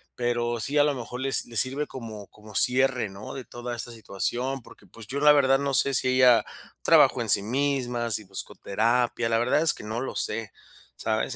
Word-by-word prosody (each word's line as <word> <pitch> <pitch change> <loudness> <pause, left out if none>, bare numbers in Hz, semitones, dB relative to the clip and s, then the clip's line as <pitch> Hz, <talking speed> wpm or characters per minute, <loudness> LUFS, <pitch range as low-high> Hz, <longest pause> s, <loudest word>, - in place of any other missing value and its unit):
Pero 120 -1 -1
sí, 140 +6 -2
a 145 - +6
lo 145 0 +1
mejor 125 0 -7
le 135 - -1
s 135 - +1
le 115 - -11
sirve 135 +6 0
como 110 -5 -9
como 105 0 -16
cierre 125 +1 +2
¿no?, 100 +2 -9
de 130 -2 -8
toda 120 0 -7
esta 120 +1 -3
situación. 120 +5 -3
Porque 105 - -18
pues, 105 +3 -13
yo 140 +5 -4
la 150 0 +7
verdad, 135 -2 +4
no 140 -1 -2
sé 140 +3 +4
si 130 0 +2
ella 130 -2 +5 0.4
trabajó - - +4
en - - -3
sí - - +8
misma, 125 0 -1
si 105 0 +2
buscó 95 0 -6
terapia. 115 +3 0
La 115 - +2
verdad, 120 +6 +1
es 165 - +3
que - - -11
no 110 +3 -4
lo 135 - -5
sé, 110 -3 -2 0.5
¿sabes? - - -2
120 Hz, 215 wpm, -25 LUFS, 115-135 Hz, 0.5 s, sí